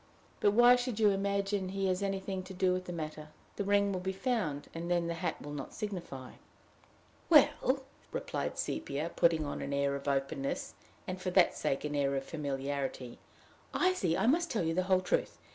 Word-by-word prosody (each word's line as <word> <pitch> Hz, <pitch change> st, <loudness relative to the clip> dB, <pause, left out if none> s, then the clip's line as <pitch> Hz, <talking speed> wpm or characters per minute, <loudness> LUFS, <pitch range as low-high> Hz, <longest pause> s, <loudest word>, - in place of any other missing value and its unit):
"But 205 Hz, -, +4 dB
why 240 Hz, +2 st, +8 dB
should 245 Hz, -3 st, -3 dB
you 215 Hz, -2 st, +6 dB
imagine 200 Hz, 0 st, 0 dB
he 195 Hz, 0 st, -1 dB
has 185 Hz, -1 st, +1 dB
had 200 Hz, -, 0 dB
anything 195 Hz, -1 st, -3 dB
to 190 Hz, 0 st, -9 dB
do 185 Hz, 0 st, +2 dB
with 185 Hz, 0 st, -2 dB
the 180 Hz, -, -5 dB
matter? 155 Hz, -2 st, -5 dB, 0.3 s
The 205 Hz, -, 0 dB
ring 200 Hz, 0 st, +3 dB
will 185 Hz, -, -1 dB
be 190 Hz, +1 st, -2 dB
found, 190 Hz, -, -1 dB
and 170 Hz, +1 st, -5 dB
then 175 Hz, -1 st, +2 dB
the 170 Hz, -, -1 dB
hat 165 Hz, -, -3 dB
will 145 Hz, -, -7 dB
not 145 Hz, -, -6 dB
signify." 175 Hz, -, -5 dB, 1.0 s
"Well," 275 Hz, -4 st, +5 dB, 0.3 s
replied -, -, -3 dB
Sepia, 165 Hz, -, -2 dB
putting 165 Hz, -2 st, +3 dB
on 145 Hz, -, -4 dB
an 140 Hz, -, -3 dB
air 140 Hz, 0 st, +1 dB
of 140 Hz, +1 st, -6 dB
openness, 135 Hz, 0 st, -1 dB, 0.3 s
and 185 Hz, 0 st, -5 dB
for 185 Hz, -, -1 dB
that 180 Hz, -1 st, +4 dB
sake 150 Hz, -1 st, -1 dB
an 150 Hz, -, -2 dB
air 140 Hz, -1 st, +1 dB
of 135 Hz, -, -1 dB
familiarity, 140 Hz, -4 st, -3 dB, 0.6 s
"I 370 Hz, +1 st, +3 dB
see 170 Hz, -, 0 dB
I -, -, +1 dB
must 335 Hz, +7 st, +3 dB
tell 215 Hz, -, 0 dB
you 165 Hz, 0 st, 0 dB
the 185 Hz, -, +2 dB
whole 185 Hz, -1 st, +5 dB
truth. 185 Hz, -, 0 dB
185 Hz, 200 wpm, -32 LUFS, 145-200 Hz, 1.0 s, why